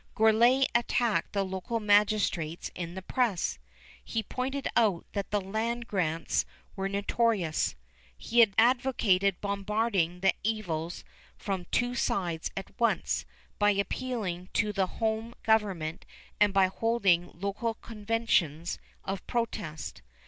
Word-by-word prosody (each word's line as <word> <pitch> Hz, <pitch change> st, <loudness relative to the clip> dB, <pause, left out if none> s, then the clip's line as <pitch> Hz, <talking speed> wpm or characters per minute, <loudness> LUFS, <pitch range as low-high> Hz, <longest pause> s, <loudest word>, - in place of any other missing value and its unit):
Gourlay 235 Hz, +5 st, +5 dB
attacked 235 Hz, -1 st, +1 dB
the 200 Hz, -1 st, +1 dB
local 190 Hz, +5 st, -3 dB
magistrates 205 Hz, -6 st, +2 dB
in 175 Hz, 0 st, -6 dB
the 190 Hz, -, -6 dB
press. 230 Hz, -6 st, 0 dB, 0.4 s
He 225 Hz, -1 st, -2 dB
pointed 265 Hz, +5 st, -3 dB
out 210 Hz, -7 st, +3 dB
that 200 Hz, -2 st, -3 dB
the 210 Hz, -, +1 dB
land 225 Hz, +5 st, -2 dB
grants 165 Hz, -6 st, 0 dB, 0.3 s
were 195 Hz, -1 st, -2 dB
notorious. 200 Hz, -4 st, +1 dB, 0.4 s
He 235 Hz, +1 st, +5 dB
advocated 225 Hz, -6 st, +3 dB
bombarding 200 Hz, -3 st, 0 dB
the 190 Hz, 0 st, +4 dB
evils 175 Hz, -6 st, -2 dB, 0.3 s
from 190 Hz, -3 st, -3 dB
two 245 Hz, +7 st, 0 dB
sides 175 Hz, -8 st, -1 dB
at 195 Hz, -, -5 dB
once, 235 Hz, -, +1 dB, 0.3 s
by 205 Hz, 0 st, +5 dB
appealing 200 Hz, -3 st, -2 dB
to 210 Hz, 0 st, +1 dB
the 190 Hz, -2 st, +1 dB
home 225 Hz, +3 st, -2 dB
government 190 Hz, -7 st, 0 dB, 0.3 s
and 210 Hz, -1 st, +5 dB
by 195 Hz, -1 st, +5 dB
holding 190 Hz, -3 st, +2 dB
local 205 Hz, +4 st, -2 dB
conventions 210 Hz, -8 st, -1 dB, 0.2 s
of 195 Hz, -1 st, -4 dB
protest. 210 Hz, -10 st, -3 dB
205 Hz, 120 wpm, -29 LUFS, 185-230 Hz, 0.4 s, Gourlay